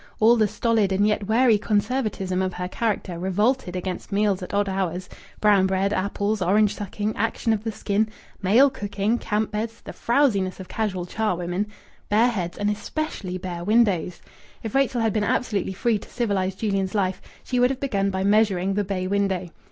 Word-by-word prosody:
All 225 Hz, +2 st, +6 dB
the 220 Hz, -2 st, +3 dB
stolid 220 Hz, -2 st, +1 dB
and 195 Hz, +2 st, +2 dB
yet 210 Hz, -2 st, 0 dB
wary 225 Hz, -1 st, +4 dB
conservatism 205 Hz, -4 st, 0 dB
of 185 Hz, -1 st, -2 dB
her 180 Hz, 0 st, -3 dB
character 195 Hz, -4 st, -2 dB
revolted 190 Hz, +2 st, 0 dB
against 180 Hz, 0 st, -4 dB
meals 200 Hz, -1 st, +1 dB
at 180 Hz, -, -6 dB
odd 205 Hz, 0 st, +1 dB
hours, 185 Hz, -2 st, -2 dB, 0.3 s
brown 205 Hz, -3 st, +4 dB
bread, 190 Hz, +1 st, 0 dB
apples, 200 Hz, +1 st, -1 dB
orange 205 Hz, +3 st, +3 dB
sucking, 205 Hz, +1 st, -3 dB
action 225 Hz, +1 st, 0 dB
of 215 Hz, -1 st, -2 dB
the 225 Hz, -, -2 dB
skin, 210 Hz, +1 st, 0 dB, 0.3 s
male 235 Hz, +9 st, +5 dB
cooking, 205 Hz, 0 st, -1 dB
camp 215 Hz, 0 st, -1 dB
beds, 225 Hz, +2 st, -3 dB
the -, -, -9 dB
frowsiness 225 Hz, -8 st, +1 dB
of 185 Hz, -, -8 dB
casual 190 Hz, -4 st, -2 dB
charwomen, 180 Hz, -1 st, -1 dB, 0.4 s
bare 225 Hz, +4 st, +4 dB
heads, 180 Hz, -7 st, -3 dB
and 205 Hz, 0 st, +1 dB
especially 210 Hz, -, -4 dB
bare 175 Hz, -2 st, -5 dB
windows. 200 Hz, -5 st, +2 dB, 0.4 s
If 225 Hz, -, -5 dB
Rachel 270 Hz, -3 st, +2 dB
had 225 Hz, -2 st, +1 dB
been 215 Hz, -, +1 dB
absolutely 210 Hz, -4 st, 0 dB
free 225 Hz, +2 st, +1 dB
to -, -, -14 dB
civilize 195 Hz, -6 st, -1 dB
Julian's 195 Hz, -1 st, -1 dB
life, 190 Hz, -2 st, 0 dB, 0.2 s
she 250 Hz, -, -1 dB
would 250 Hz, +1 st, +5 dB
have 265 Hz, -1 st, -3 dB
begun 200 Hz, -8 st, 0 dB
by 190 Hz, -1 st, -2 dB
measuring 200 Hz, -2 st, +2 dB
the 205 Hz, +1 st, 0 dB
bay 185 Hz, -1 st, -3 dB
window. 190 Hz, -2 st, 0 dB
205 Hz, 180 wpm, -24 LUFS, 190-220 Hz, 0.4 s, All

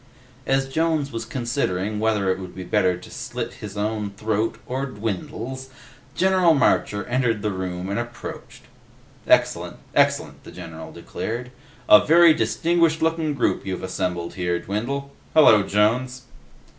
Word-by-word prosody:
As 135 Hz, 0 st, +2 dB
Jones 155 Hz, 0 st, 0 dB
was 115 Hz, -1 st, -4 dB
considering 110 Hz, -6 st, -2 dB
whether 105 Hz, -3 st, +1 dB
it 95 Hz, -, -2 dB
would 90 Hz, -2 st, -9 dB
be 95 Hz, -, -6 dB
better 90 Hz, 0 st, +1 dB
to 90 Hz, -, -13 dB
slit -, -, -5 dB
his 105 Hz, -1 st, -7 dB
own 105 Hz, 0 st, -2 dB
throat 110 Hz, +2 st, -2 dB
or 135 Hz, +2 st, -3 dB
Dwindle's, 115 Hz, +4 st, -5 dB, 0.5 s
General 185 Hz, -3 st, +4 dB
Marcher 105 Hz, -6 st, +1 dB
entered 120 Hz, -4 st, 0 dB
the 105 Hz, -, 0 dB
room 90 Hz, -1 st, -4 dB
and 100 Hz, +3 st, -2 dB
approached. 120 Hz, 0 st, -8 dB, 0.6 s
"Excellent. -, -, +2 dB, 0.2 s
Excellent," -, -, +1 dB
the -, -, -11 dB
general 80 Hz, -1 st, -9 dB
declared. 125 Hz, +3 st, -5 dB, 0.4 s
"A 105 Hz, -, +8 dB
very 170 Hz, +1 st, +7 dB
distinguished 160 Hz, +7 st, +1 dB
looking 160 Hz, -2 st, 0 dB
group 130 Hz, -, 0 dB
you've 95 Hz, -2 st, -4 dB
assembled 90 Hz, -2 st, -3 dB
here, 90 Hz, -2 st, -1 dB
Dwindle. 120 Hz, +10 st, -4 dB, 0.2 s
Hello, 110 Hz, -9 st, +7 dB
Jones." 120 Hz, +6 st, +1 dB
110 Hz, 140 wpm, -23 LUFS, 100-135 Hz, 0.6 s, A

